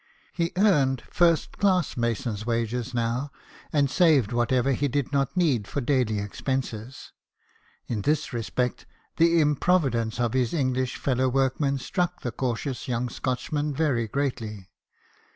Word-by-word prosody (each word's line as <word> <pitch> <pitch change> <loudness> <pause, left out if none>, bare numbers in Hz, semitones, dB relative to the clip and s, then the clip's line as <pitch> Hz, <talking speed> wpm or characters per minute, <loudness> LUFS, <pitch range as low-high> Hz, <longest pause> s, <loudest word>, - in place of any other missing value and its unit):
He 170 -1 -1
earned 145 - +3
first 170 -2 +2
class 185 -5 +2
mason's 115 -2 -2
wages 115 +1 -1
now, 120 +4 -1 0.4
and 145 -2 +3
saved 140 - +3
what 120 +1 +1
ever 130 +1 +2
he 145 +2 +1
did 140 +1 -2
not 140 +5 0
need 135 - +2
for - - -2
daily 125 -5 +1
expenses. 120 +3 -4 0.7
In 110 -4 -3
this 150 +5 0
respect, 125 +2 -2 0.3
the 170 0 +4
improvidence 140 -7 +1
of 120 -1 0
his 130 +2 +1
English 130 -3 0
fellow 130 -1 +1
workmen 135 +2 +1
struck 175 +5 -2
the 120 - -3
cautious 125 +2 -3
young 125 0 -1
Scotchman 145 +5 -2
very 130 -7 +1
greatly. 110 -7 -3
130 Hz, 135 wpm, -26 LUFS, 120-145 Hz, 0.7 s, the